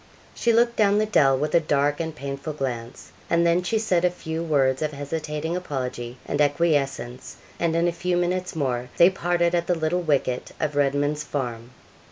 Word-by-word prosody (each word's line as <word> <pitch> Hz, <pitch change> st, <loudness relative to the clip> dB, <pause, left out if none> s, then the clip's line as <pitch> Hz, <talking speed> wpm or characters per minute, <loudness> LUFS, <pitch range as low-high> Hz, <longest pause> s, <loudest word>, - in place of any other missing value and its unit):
She 235 Hz, -, +1 dB
looked 235 Hz, +1 st, +3 dB
down 205 Hz, -1 st, +4 dB
the 215 Hz, -, +2 dB
dell, 140 Hz, -11 st, +4 dB
with 150 Hz, +3 st, -2 dB
a 170 Hz, -, +6 dB
dark 145 Hz, -2 st, +1 dB
and 160 Hz, -1 st, -3 dB
painful 140 Hz, +2 st, -5 dB
glance, 125 Hz, -4 st, -5 dB, 0.2 s
and 170 Hz, 0 st, +3 dB
then 170 Hz, +1 st, +3 dB
she 180 Hz, +5 st, 0 dB
said 185 Hz, -6 st, +1 dB
a 180 Hz, -, +4 dB
few 160 Hz, -2 st, -5 dB
words 135 Hz, -5 st, +1 dB
of 155 Hz, -1 st, -1 dB
hesitating 150 Hz, +3 st, -3 dB
apology 130 Hz, -7 st, -4 dB
and 150 Hz, -, -1 dB
acquiescence, 145 Hz, -5 st, 0 dB, 0.2 s
and 165 Hz, -1 st, +1 dB
in 170 Hz, +1 st, +2 dB
a -, -, +2 dB
few 180 Hz, +1 st, -1 dB
minutes 180 Hz, 0 st, -1 dB
more 125 Hz, -4 st, -1 dB
they 175 Hz, +2 st, +7 dB
parted 175 Hz, -2 st, 0 dB
at 170 Hz, -1 st, 0 dB
the 180 Hz, -, +2 dB
little 165 Hz, +2 st, 0 dB
wicket 140 Hz, -6 st, -1 dB
of 150 Hz, -2 st, -1 dB
Redman's 145 Hz, +1 st, +1 dB
Farm. 120 Hz, -6 st, -4 dB
155 Hz, 190 wpm, -24 LUFS, 140-175 Hz, 0.2 s, they